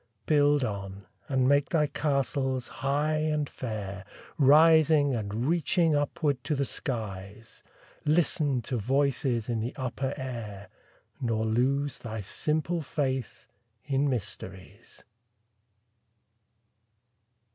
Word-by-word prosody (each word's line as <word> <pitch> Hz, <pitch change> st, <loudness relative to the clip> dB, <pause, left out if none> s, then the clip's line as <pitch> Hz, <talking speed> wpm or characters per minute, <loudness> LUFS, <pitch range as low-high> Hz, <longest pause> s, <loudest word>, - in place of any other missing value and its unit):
Build 145 Hz, -2 st, +4 dB
on, 100 Hz, -3 st, -5 dB, 0.2 s
and 130 Hz, -2 st, +2 dB
make 140 Hz, 0 st, +3 dB
thy 160 Hz, -4 st, +3 dB
castles 135 Hz, -3 st, -1 dB
high 145 Hz, +3 st, +1 dB
and 155 Hz, -1 st, 0 dB
fair, 105 Hz, -6 st, -5 dB, 0.4 s
Rising 150 Hz, 0 st, +6 dB
and 110 Hz, +1 st, -2 dB
reaching 165 Hz, 0 st, +2 dB
upward 145 Hz, -2 st, 0 dB
to 150 Hz, -, 0 dB
the 140 Hz, 0 st, 0 dB
skies; 105 Hz, -5 st, -5 dB, 0.4 s
Listen 150 Hz, -5 st, +1 dB
to 125 Hz, +3 st, -2 dB
voices 130 Hz, 0 st, 0 dB
in 120 Hz, -2 st, -1 dB
the 115 Hz, +3 st, -4 dB
upper 130 Hz, +1 st, -3 dB
air, 115 Hz, -7 st, -6 dB, 0.5 s
Nor 115 Hz, -2 st, 0 dB
lose 135 Hz, +5 st, 0 dB
thy 110 Hz, -2 st, -6 dB
simple 155 Hz, -, -1 dB
faith 135 Hz, -3 st, -3 dB, 0.4 s
in 140 Hz, 0 st, +1 dB
mysteries. 100 Hz, -3 st, -6 dB
135 Hz, 105 wpm, -28 LUFS, 115-145 Hz, 0.5 s, Rising